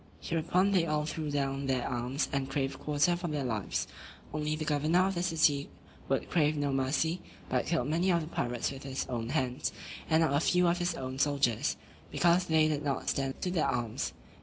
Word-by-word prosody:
Hereupon 180 +4 +1
they 180 -4 +3
all 150 0 0
threw 155 0 -3
down 140 -1 -1
their 130 -2 0
arms, 125 +3 -1
and 135 -1 -1
craved 135 -1 -2
quarter 150 +4 +2
for 175 0 -4
their 150 -3 -2
lives; 110 -6 -2 0.5
only 150 0 -1
the 155 0 -4
governor 155 +5 +3
of 195 - 0
the 175 - -2
city 160 -5 +2 0.4
would - - 0
crave 150 -2 +2
no 145 -1 0
mercy, 145 +6 0 0.3
but - - 0
killed 160 -7 +1
many 170 +5 +2
of 170 -1 +3
the 155 - -6
pirates 120 -6 -2
with 135 -1 -8
his 135 -1 -3
own 115 -2 -3
hands, 130 -3 -1 0.4
and 160 0 +4
not 150 -3 +1
a 145 - +4
few 180 +2 +3
of 170 +1 +2
his 175 0 0
own 130 0 -5
soldiers; 140 -6 +1 0.3
because 175 +1 +3
they 160 -2 +4
did 150 -2 0
not 140 -2 -1
stand 135 -1 -1
to 180 - 0
their 175 -3 +1
arms. 115 -2 -2
150 Hz, 205 wpm, -31 LUFS, 135-165 Hz, 0.5 s, and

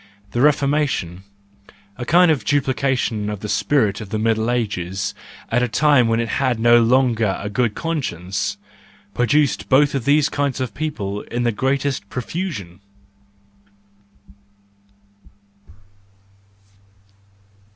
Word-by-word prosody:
The 120 - -1
Reformation, 140 - +1 0.7
a 120 - -6
kind 175 +1 +5
of 140 -8 0
duplication 130 -6 0
of 105 -2 -5
the 105 - -5
spirit 110 -3 +1
of 105 - -8
the 110 - -2
Middle 110 +1 0
Ages 100 -6 -2 0.4
at 120 +2 +2
a 125 - +1
time 135 +1 +3
when 115 0 +1
it 115 - -1
had 130 -4 +1
no 120 +1 +5
longer 115 -4 +2
a 105 - -5
good 115 -1 0
conscience, 110 - -3 0.6
produced 140 +3 +1
both 140 +2 +4
of 135 -4 -2
these 145 +1 +4
kinds 140 -2 -2
of 125 -5 -3
people 105 -10 -4
in 120 +1 -2
the 120 - +2
greatest 135 -1 -1
profusion. 125 - -5
120 Hz, 120 wpm, -20 LUFS, 105-140 Hz, 0.7 s, kind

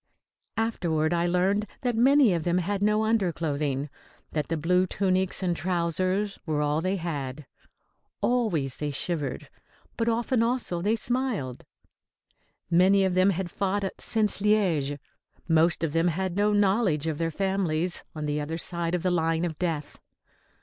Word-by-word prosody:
Afterward 170 -8 0
I 170 0 +1
learned 190 +4 +1
that 245 -2 0
many 260 -1 +5
of 165 -2 -1
them 175 +1 +1
had 195 +3 -1
no 210 +1 +2
underclothing, 155 -9 0 0.4
that 150 -2 -2
the 165 - -1
blue 180 +4 +2
tunics 190 0 0
and 175 -2 +1
trousers 185 +4 -1
were 155 -4 -1
all 150 +1 +1
they 185 +3 0
had. 150 -6 -4 0.7
Always 180 - 0
they 150 - -2
shivered, 145 0 -3 0.5
but 230 0 +1
often 235 +1 +1
also 230 -7 0
they 210 +5 +2
smiled. 230 - -2 1.1
Many 190 +3 +5
of 190 - 0
them 185 +2 +4
had 185 -2 -2
fought 200 0 -1
since 215 -3 +2
Liège; 180 -9 +1 0.5
most 165 0 +3
of 155 -3 -1
them 165 +1 +2
had 180 +1 -1
no 205 +1 +2
knowledge 195 -6 +2
of 160 -2 -2
their 165 0 0
families 180 -2 -1
on 155 -1 -4
the 150 0 -1
other 160 +3 -4
side 170 0 -1
of 175 - -3
the 185 - +1
line 165 0 +1
of 160 -3 -5
death. 160 -5 -3
180 Hz, 155 wpm, -26 LUFS, 160-205 Hz, 1.1 s, many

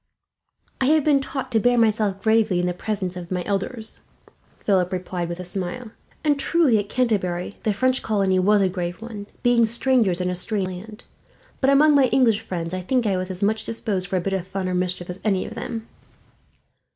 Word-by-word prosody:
"I - - +3
have 305 +2 +4
been 290 -2 +4
taught 265 -1 -5
to 225 - +3
bear 245 +2 +3
myself 215 -3 +1
gravely, 220 -4 +3
in 180 - 0
the 180 - 0
presence 190 -1 -3
of 175 -1 -7
my 180 -1 -2
elders," 220 +3 -1 0.7
Philip 185 -3 +2
replied 180 -2 -3
with 175 +1 -5
a 180 - -6
smile; 195 +6 -5 0.3
"and 295 -2 +2
truly 280 -7 +3
at 205 0 -4
Canterbury 200 -7 -1
the 215 - +1
French 255 +5 +1
colony 195 -3 +1
was 200 +2 +4
a - - +3
grave 180 -1 -4
one, 215 -3 -8 0.2
being 245 -1 +4
strangers 235 -5 +2
in 180 0 -1
a - - -1
strange 185 +1 -1
land; 210 +5 -9 0.6
but 270 - +2
among 295 +2 +5
my 280 -2 +5
English 235 -4 +3
friends, 175 -5 -4
I 185 - -2
think 245 +6 0
I 200 -3 +1
was 185 0 -3
as 185 +1 -5
much 220 +2 +1
disposed 210 -5 -2
for 185 - -1
a - - 0
bit 195 +2 -2
of 185 -2 -2
fun 190 -1 -3
or 185 - -1
mischief 180 -1 -1
as 180 +1 -6
any 195 -4 +1
of - - -7
them." 230 -1 -6
205 Hz, 210 wpm, -23 LUFS, 185-235 Hz, 0.7 s, among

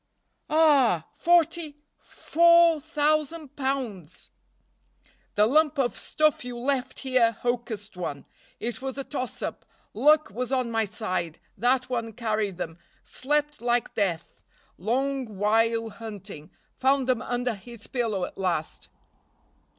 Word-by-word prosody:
"Ah! 280 - +4
forty 335 -3 +2 0.2
four 340 -1 +4
thousand 305 -1 0
pounds." 250 - -4 1.0
"The 210 - +5
lump 300 +5 +3
of 255 -3 +1
stuff 305 -3 +1
you 245 -1 -6
left 260 +1 -2
here 255 -4 +3
hocussed 235 -4 -3
one 145 -6 -5 0.3
it 240 +2 -4
was 265 0 -4
a 275 - -2
toss 255 -3 -5
up - - -4 0.3
luck 300 +5 +4
was 250 +4 -4
on 255 -3 0
my 225 -1 +1
side 185 -6 -3 0.2
that 250 +4 +2
one 235 -3 -3
carried 215 -4 -1
them 165 -2 -5 0.2
slept 295 +1 -1
like 240 0 0
death 175 -6 -2 0.4
long 255 +1 -1
while 225 +2 +2
hunting 205 -8 -9 0.2
found 265 0 +2
them 250 -3 +1
under 245 0 -1
his 225 +2 -11
pillow 220 -7 -1
at - - -11
last." 175 -5 -2
245 Hz, 125 wpm, -26 LUFS, 215-275 Hz, 1.0 s, The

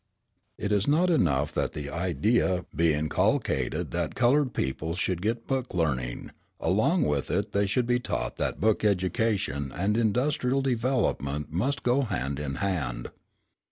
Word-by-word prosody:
It 105 - -3
is 100 0 +2
not 170 +5 +3
enough 75 - +2
that - - -1
the 70 -1 -5
idea 90 +1 +1
be 85 +1 +3
inculcated 80 - 0
that - - -2
coloured 130 +2 +3
people 80 +1 -2
should 90 -1 -1
get 115 +3 -1
book 130 -6 -2
learning; 65 -8 -1 0.3
along - - +2
with 75 -2 -1
it 100 +3 -1
they 100 0 +1
should 120 +5 +1
be 120 0 +2
taught - - -3
that - - -2
book 110 +1 +2
education 95 -7 0
and 100 +7 0
industrial 125 +4 +1
development 115 - -1
must 130 - -1
go 125 +3 +3
hand 70 - -2
in 70 -2 -3
hand. 80 -12 -2
100 Hz, 150 wpm, -27 LUFS, 75-120 Hz, 0.3 s, not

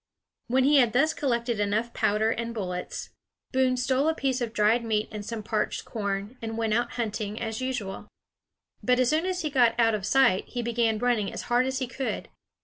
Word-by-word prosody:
When 260 +2 +3
he 290 +2 +5
had 245 -4 +4
thus 310 +6 +3
collected 235 -6 -1
enough 215 +3 0
powder 215 +2 +2
and 235 0 -3
bullets, 180 -4 -4 0.4
Boone 260 -1 +2
stole 260 +4 +2
a 320 - 0
piece 265 -3 -1
of 235 -2 -2
dried 220 +2 +3
meat 215 -2 0
and 210 -1 -6
some 220 0 -5
parched 215 0 -2
corn, 205 +2 -4
and 225 0 -4
went 225 -2 0
out 240 +2 0
hunting, 215 -2 -3
as 225 0 -3
usual. 245 -7 -4 0.7
But 250 0 +2
as 255 -1 +3
soon 320 +4 +1
as 365 -1 -2
he 305 - -2
got 240 -3 +3
out 225 -1 +4
of 205 -3 -2
sight 265 -8 +4
he 245 -1 -4
began 230 -1 +1
running 230 -3 +1
as - - -5
hard 250 +2 +4
as 265 0 -1
he 260 - -1
could. 255 +2 -4
235 Hz, 205 wpm, -27 LUFS, 215-255 Hz, 0.7 s, he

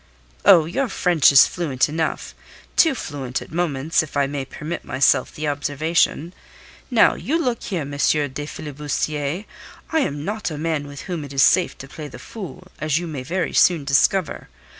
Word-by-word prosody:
"Oh, 165 -3 +7
your 240 - -1
French 175 -10 +4
is 140 - +8
fluent 145 -8 0
enough; 160 +1 -3 0.4
too 320 -5 +4
fluent 135 - -4
at - - -12
moments, 160 -3 0
if 155 -2 -6
I 140 - +3
may 140 -1 -4
permit 155 +5 -6
myself 130 0 +2
the 155 0 -4
observation. 150 +3 0 0.6
Now, - - +5
look 280 -7 -2
you 185 - 0
here, - - -2
M. 145 0 -6
le 145 - -6 0.5
filibustier, 150 +3 -3 0.5
I 320 - +2
am 145 - -2
not 210 +1 -3
a 155 - -6
man 155 -2 -2
with 145 0 -9
whom 175 -5 -5
it 140 -1 -9
is 135 - +4
safe 185 - +3
to 135 - -10
play 150 +2 -8
the - - -10
fool, 185 -4 -9
as 155 -1 0
you 175 - -2
may 150 -5 -5
very 175 +7 -2
soon 165 -6 +4
discover. 155 +6 +1
155 Hz, 180 wpm, -22 LUFS, 145-175 Hz, 0.6 s, is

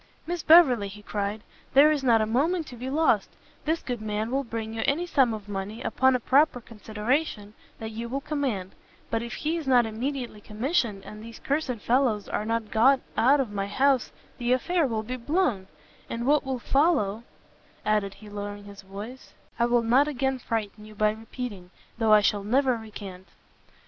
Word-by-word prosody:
"Miss 345 0 -3
Beverley," 275 -12 +6
he 210 +1 -11
cried, 205 +1 -3 0.3
"there 290 +3 +8
is 295 -3 0
not 230 -4 +4
a - - +1
moment 310 +10 +1
to 250 - -10
be 250 +2 -5
lost; 315 +4 +2 0.4
this 320 +2 0
good 245 -3 -4
man 215 +1 -2
will 275 +1 0
bring 225 -2 -5
you 225 - -3
any 320 +6 +1
sum 270 -8 +3
of 215 -2 -6
money, 205 +2 -5
upon 260 0 +3
a - - +1
proper 270 +2 +3
consideration, 220 0 -3 0.2
that 220 0 -6
you 230 +2 -5
will 270 +3 -2
command; 270 -11 -2 0.4
but 225 - 0
if 235 0 -6
he 320 +3 -1
is 315 -4 -6
not 250 -3 +5
immediately 240 0 -4
commissioned, 220 - -1
and 210 0 -9
these 230 0 -10
cursed 280 -3 -1
fellows 240 -5 +2
are 210 - -2
not 225 -1 -2
got 260 +5 +5 0.2
out 275 +5 +4
of 255 -6 -1
my 200 -1 -2
house, 265 +4 +2 0.3
the 240 0 0
affair 325 +4 +1
will 220 -3 -2
be 250 +3 -5
blown," 250 - 0 0.4
"and 235 +1 -3
what 295 +3 +3
will 265 -2 -2
follow," 250 - +1 0.6
added 210 -2 +1
he, 215 +1 -14
lowering 205 0 -6
his 200 -1 -11
voice, 205 +7 -10 0.2
"I 235 - +4
will 240 -1 +2
not 255 +6 +4
again 265 -2 -1
frighten 215 -3 -4
you 215 0 -13
by 210 +1 +3
repeating, 220 -4 -7 0.3
though 225 -1 +3
I 210 0 +8
shall 205 0 +1
never 255 +4 +2
recant." 200 -4 -9
230 Hz, 190 wpm, -26 LUFS, 210-270 Hz, 0.6 s, there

